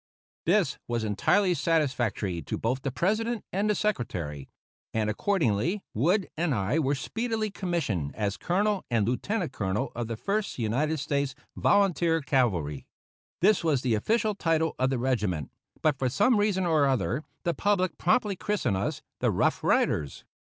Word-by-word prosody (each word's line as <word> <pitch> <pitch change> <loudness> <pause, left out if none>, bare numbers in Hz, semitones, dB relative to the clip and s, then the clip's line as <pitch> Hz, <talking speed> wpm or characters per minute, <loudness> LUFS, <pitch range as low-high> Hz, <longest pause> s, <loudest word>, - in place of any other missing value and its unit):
This - - +2
was 120 -2 -1
entirely 180 - +2
satisfactory 125 - 0
to - - -4
both 125 +4 -1
the 135 - -2
President 215 - -1
and 205 +2 +1
Secretary, 85 - -2 0.5
and, 110 -1 +1
accordingly, 165 - 0
Wood 175 - +2
and 160 -4 0
I 110 +9 +1
were 140 -1 +1
speedily 220 - -2
commissioned 155 - -2
as 105 -2 -1
Colonel 200 +2 0
and 115 -4 +1
Lieutenant 175 - -1
Colonel 105 +3 -2
of 120 -1 -3
the 115 -1 -4
First 200 - -2
United 130 +8 0
States 140 -1 -1 0.2
Volunteer 175 -5 +3
Cavalry. 105 - 0 0.5
This 195 0 +4
was 150 -6 +1
the 125 -3 +1
official 215 - +1
title 165 -4 +1
of 130 +1 +2
the 135 - 0
regiment, 105 - -1 0.3
but 150 -4 +2
for 130 - +1
some 230 - +3
reason 205 -3 +1
or 155 -4 +3
other 130 +2 0 0.2
the 170 - +1
public 185 +1 0
promptly 200 +2 +2
christened 175 - -1
us 95 - -3 0.2
the - - +2
"Rough - - +1
Riders." 70 -2 +1
145 Hz, 150 wpm, -28 LUFS, -, 0.5 s, This